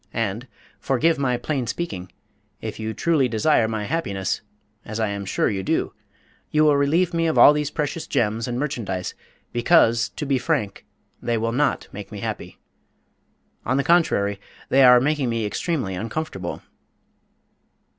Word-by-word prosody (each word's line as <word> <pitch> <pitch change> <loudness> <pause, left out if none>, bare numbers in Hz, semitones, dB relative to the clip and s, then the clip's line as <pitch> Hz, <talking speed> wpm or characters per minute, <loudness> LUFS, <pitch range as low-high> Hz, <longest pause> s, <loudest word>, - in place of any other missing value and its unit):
And 115 +2 -2 0.3
forgive 155 +4 +1
my 125 -3 +1
plain 130 -1 -2
speaking 95 - -4 0.5
if - - -6
you 110 0 -3
truly 145 +2 +2
desire 115 +1 +2
my 110 -1 -3
happiness 100 - -2 0.4
(as 110 +1 -6
I 110 -2 +1
am 100 -1 -4
sure - - 0
you 95 -2 -1
do) - - -1 0.6
you 155 0 +3
will 150 -1 +5
relieve 165 +6 +2
me 165 0 +1
of 160 - 0
all 145 - +9
these 150 -1 -1
precious 150 +1 -3
gems 110 +1 0
and 120 0 -3
merchandise, 110 -10 -3 0.4
because, 120 -3 +4
to 150 - -6
be 135 -2 +1
frank, 125 -10 -2 0.3
they 120 -1 0
will 115 +1 -1
not 145 +5 0
make - - -9
me - - -7
happy. - - -5 1.1
On 130 +3 0
the 140 - +2
contrary, 100 - +2 0.3
they 135 0 +5
are 125 -1 +8
making 145 -1 0
me 115 -2 -1
extremely 130 - -2
uncomfortable." 110 - -4
125 Hz, 155 wpm, -23 LUFS, 110-150 Hz, 1.1 s, all